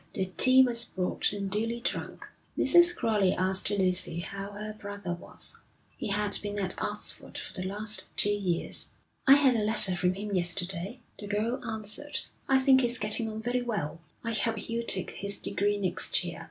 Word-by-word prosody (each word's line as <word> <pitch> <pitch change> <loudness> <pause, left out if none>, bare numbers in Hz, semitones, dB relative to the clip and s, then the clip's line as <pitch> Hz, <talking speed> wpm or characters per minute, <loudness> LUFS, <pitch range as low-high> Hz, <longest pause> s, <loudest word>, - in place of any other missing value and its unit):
The 190 -4 -3
tea 260 0 +7
was 235 -2 +1
brought 185 -5 -2
and 200 -1 -4
duly 225 +4 -1
drunk. - - -5 0.3
Mrs. 345 0 +6
Crowley 205 -4 +1
asked 190 +1 +1
Lucy 185 -4 +1
how 200 +3 -7
her 210 +1 -6
brother 205 -3 -6
was. 175 - -2 0.4
He - - -5
had 205 0 -1
been 205 0 -5
at 190 -2 -1
Oxford - - -3
for - - -7
the 185 -1 -5
last 210 +2 +1
two 205 - +4
years. 190 -5 -1 0.4
'I 270 - +10
had 280 -3 +4
a 220 - 0
letter 210 -3 +3
from 180 +1 0
him 205 +1 -5
yesterday,' 180 +5 0 0.2
the 205 - -7
girl 220 +5 -2
answered. 220 +6 -3 0.3
'I 270 - +5
think 265 -1 +5
he's 240 0 +2
getting 220 +1 0
on 220 0 -7
very 245 +1 0
well. 200 -9 -4 0.2
I 230 -1 -2
hope 225 +1 0
he'll 230 +2 -4
take 190 -5 0
his 200 0 -2
degree 205 +1 -1
next 185 -2 +1
year.' 175 -1 -6
205 Hz, 180 wpm, -28 LUFS, 190-230 Hz, 0.4 s, I